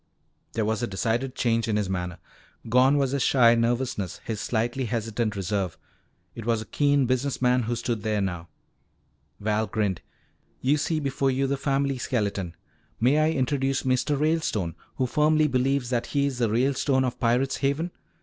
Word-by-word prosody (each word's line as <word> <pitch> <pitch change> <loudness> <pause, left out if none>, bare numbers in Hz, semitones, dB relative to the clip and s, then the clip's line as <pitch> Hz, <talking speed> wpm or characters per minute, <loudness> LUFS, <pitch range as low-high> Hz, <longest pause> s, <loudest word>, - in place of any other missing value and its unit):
There 110 -2 0
was 110 +2 -1
a 120 - 0
decided 115 +6 -1
change 115 -2 +1
in 110 - 0
his 105 -2 0
manner. 90 -2 -3 0.5
Gone 130 +5 +4
was 135 -2 +1
his 140 -1 0
shy 120 -4 +5
nervousness, 115 -5 -1
his 110 -3 -3
slightly 120 +3 -1
hesitant 115 -1 -2
reserve. 95 -2 -2 0.6
It 115 - -7
was 115 0 +1
a 110 - -6
keen 145 +1 +2
business 130 +2 0
man 125 0 +3
who 120 +1 -2
stood 115 -1 -2
there 110 -1 0
now. 90 -3 -3 0.9
Val 110 +1 0
grinned. 105 -5 -1 0.6
"You 140 +4 +2
see 155 +2 0
before 135 -1 0
you 135 +1 +1
the 140 +1 0
family 135 -1 0
skeleton. 100 -8 -2 0.4
May 130 +6 +4
I 155 +1 +3
introduce 135 +1 0
Mr. 130 +2 +1
Ralestone, 150 - 0 0.2
who 130 - 0
firmly 155 +4 +3
believes 130 -1 0
that 120 -2 0
he 140 -1 +1
is 135 -3 -2
the 115 -3 +2
Ralestone 130 +3 +2
of 125 - -3
Pirate's 125 +3 +1
Haven? 145 +5 -1
125 Hz, 170 wpm, -26 LUFS, 110-135 Hz, 0.9 s, shy